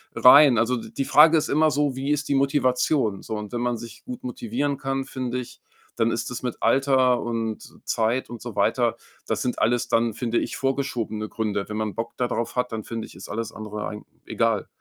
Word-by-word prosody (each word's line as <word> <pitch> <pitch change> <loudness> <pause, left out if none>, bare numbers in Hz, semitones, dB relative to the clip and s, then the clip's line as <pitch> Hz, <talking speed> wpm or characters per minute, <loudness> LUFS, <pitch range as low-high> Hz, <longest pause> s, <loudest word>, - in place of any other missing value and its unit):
rein. 135 -1 +8
Also, 115 +2 +2
d 115 - -8
die 135 - -2
Frage 155 +4 +7
ist 155 - 0
immer 155 +2 +4
so, 145 -2 0
wie 135 +2 -3
ist 145 0 0
die - - +2
Motivation 135 -5 +1
so? 110 - -5
Und 105 -1 -6
wenn 120 - -2
man 120 -1 0
sich 115 0 -11
gut 250 0 -7
motivieren 225 - -2
kann, 135 0 -2
finde 125 -2 -4
ich, 125 -2 -7 0.4
dann 115 0 +2
ist 115 +1 -3
es 125 - -5
mit 125 -2 -3
Alter 130 0 +3
und 115 -2 -3 0.2
Zeit 115 +3 0
und 120 -3 -8
so 120 -4 -7
weiter 115 +3 +2 0.3
das - - -1
sind 125 - -2
alles 120 +1 +1
dann, 115 -1 +2
finde 120 -1 0
ich, - - -4
vorgeschobene 125 -6 -2
Gründe. 105 -3 -2
Wenn 105 - -4
man 110 -2 -2
Bock 115 0 -4
da 125 - +1
drauf 120 -1 -3
hat, 125 0 0
dann 110 -1 -4
finde 115 +1 -5
ich, - - -15
ist - - -10
alles 115 +2 -3
andere 105 -1 -6
eigen 105 0 -8 0.2
egal. - - 0
120 Hz, 220 wpm, -24 LUFS, 115-135 Hz, 0.4 s, rein